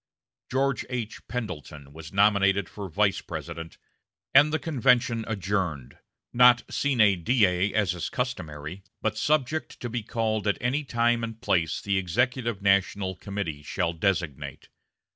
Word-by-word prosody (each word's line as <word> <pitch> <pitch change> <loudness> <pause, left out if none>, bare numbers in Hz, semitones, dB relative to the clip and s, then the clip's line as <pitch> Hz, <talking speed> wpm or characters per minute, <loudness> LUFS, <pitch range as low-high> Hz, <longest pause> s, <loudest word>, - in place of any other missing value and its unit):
George 135 +1 0
H. 120 -4 -5
Pendleton 75 - -6
was 80 0 -10
nominated 100 -1 +3
for 100 -2 -7
Vice 100 +4 +1
President, 80 0 -7 0.6
and 145 +3 +7
the 160 - +2
convention 125 -7 +2
adjourned 95 - -2 0.3
not 125 0 +6
sine 105 -10 +3
die, 95 -5 +3
as 100 -4 +2
is 90 - -4
customary, 80 - -4 0.2
but - - 0
"subject 155 +1 0
to 120 - -4
be 120 0 -2
called 110 -1 -1
at 100 - +2
any 130 +5 0
time 120 -2 +1
and 115 -1 -5
place 85 -8 0
the 100 -1 +1
executive 120 +3 -1
national 100 -1 +2
committee 95 -6 -5
shall 85 +3 -2
designate." 80 -6 -2
100 Hz, 135 wpm, -26 LUFS, 90-120 Hz, 0.6 s, and